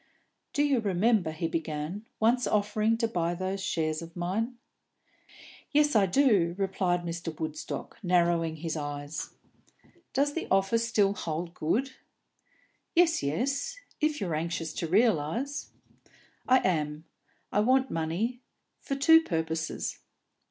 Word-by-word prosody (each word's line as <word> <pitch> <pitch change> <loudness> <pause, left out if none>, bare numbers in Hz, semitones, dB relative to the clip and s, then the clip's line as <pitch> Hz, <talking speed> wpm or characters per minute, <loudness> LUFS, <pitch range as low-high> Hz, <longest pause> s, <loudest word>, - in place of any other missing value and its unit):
"Do 290 - +2
you 280 -4 +3
remember," 205 -2 +2
he 160 +1 -2
began, 165 +5 -4
"once 240 +3 +3
offering 215 +2 +1
to 230 0 +1
buy 175 -5 -1
those 190 +2 -3
shares 155 -3 -1
of 165 0 -10
mine?" 210 +8 -2 1.1
"Yes, 295 -2 +3
I 200 -3 +5
do," 195 -7 +3
replied 190 -2 0
Mr. 165 -2 -5
Woodstock, 155 -1 -5
narrowing 170 -3 +2
his 160 +1 -4
eyes. 145 0 -5 0.8
"Does 285 +2 +1
the 330 - -3
offer 195 +4 +3
still 215 -4 +2
hold 170 -2 -4
good?" 230 - 0 1.0
"Yes, 335 -1 +4
yes; 275 - -1 0.2
if 305 -1 +1
you're 175 -5 -2
anxious 165 0 -2
to 165 - -3
realise." 220 - +1 0.8
"I 260 -4 +4
am. 155 -3 -1 0.5
I - - +2
want 260 +4 +3
money 180 +10 -1 0.4
for 275 - -3
two 320 +4 +7
purposes." 160 - -2
190 Hz, 125 wpm, -29 LUFS, 165-240 Hz, 1.1 s, two